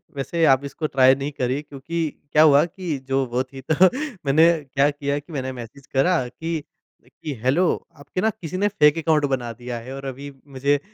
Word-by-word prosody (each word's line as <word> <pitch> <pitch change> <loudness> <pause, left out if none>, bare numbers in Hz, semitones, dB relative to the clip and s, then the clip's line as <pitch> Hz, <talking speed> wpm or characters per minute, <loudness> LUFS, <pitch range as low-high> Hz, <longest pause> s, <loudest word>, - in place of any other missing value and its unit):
वैसे 165 +5 -2
आप 135 -1 +4
इसको 155 +2 -3
ट्राई 130 -1 +5
नहीं 140 +2 -4
करिए। 130 0 -2
क्योंकि 150 +3 -6 0.3
क्या 155 - +6
हुआ 145 -2 +6
कि 175 -3 -4
जो 135 0 +1
वो 125 +1 -1
थी 135 0 -12
तो - - +4 0.5
मैंने 155 +4 +5 0.3
क्या 140 +1 +4
किया 140 0 -2
कि 150 +3 -14
मैंने 130 -2 -3
मैसेज 125 +3 -10
करा 135 -1 +2
कि 160 +5 -4 0.4
कि, 150 - -7
"हेलो 135 +8 +3 0.4
आपके 185 - -4
ना 220 - +3
किसी 185 -4 -6
ने 205 +2 +2
फेक 150 -6 +3
अकाउंट 155 -2 +2
बना 120 -3 -2
दिया 120 0 -6
है 125 +3 -9
और 135 0 -8
अभी 135 +2 -6 0.3
मुझे 140 +2 +2
140 Hz, 200 wpm, -23 LUFS, 130-160 Hz, 0.5 s, क्या